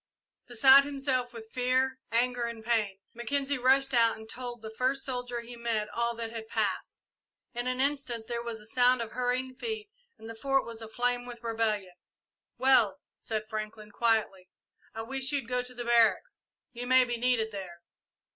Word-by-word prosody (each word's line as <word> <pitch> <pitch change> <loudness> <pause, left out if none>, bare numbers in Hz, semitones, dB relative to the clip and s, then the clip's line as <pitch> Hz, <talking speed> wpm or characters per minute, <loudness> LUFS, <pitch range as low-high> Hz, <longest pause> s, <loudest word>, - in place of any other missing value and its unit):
Beside 265 +3 +7
himself 270 -3 -1
with 225 -2 -11
fear, 255 +1 +1
anger, 245 +1 +1
and 230 -1 -6
pain, 215 -5 +1 0.2
Mackenzie 275 +3 -1
rushed 270 +2 +4
out 230 -2 +4
and 220 0 -11
told 240 -1 -6
the 220 - -6
first 260 +3 0
soldier 245 -2 -3
he 240 +1 -10
met 230 -3 -1
all 235 +2 -1
that 230 -1 -5
had 225 -1 -7
passed. - - -2 0.5
In 240 0 -3
an 255 0 0
instant 265 -5 0
there 235 -1 -2
was 235 -1 -5
the 210 - -12
sound 245 +1 +3
of 225 - -9
hurrying 250 +1 -1
feet 435 - -5 0.3
and 220 - -11
the 230 - -6
Fort 270 +4 +1
was 230 -1 -8
aflame 245 +2 -1
with 240 -1 -9
rebellion. 220 -5 -1 0.6
"Wells," 225 -8 +3
said 215 -1 -4
Franklin, 215 -1 -6
quietly, 215 -5 0 0.5
"I 225 - -4
wish 270 +3 -2
you'd 275 -5 -1
go 250 0 0
to 250 0 -9
the 240 0 -5
barracks. 235 - +3 0.3
You 245 0 -5
may 255 0 +6
be 240 -1 -2
needed 235 -2 +2
there." 180 -4 -8
240 Hz, 175 wpm, -29 LUFS, 225-255 Hz, 0.6 s, Beside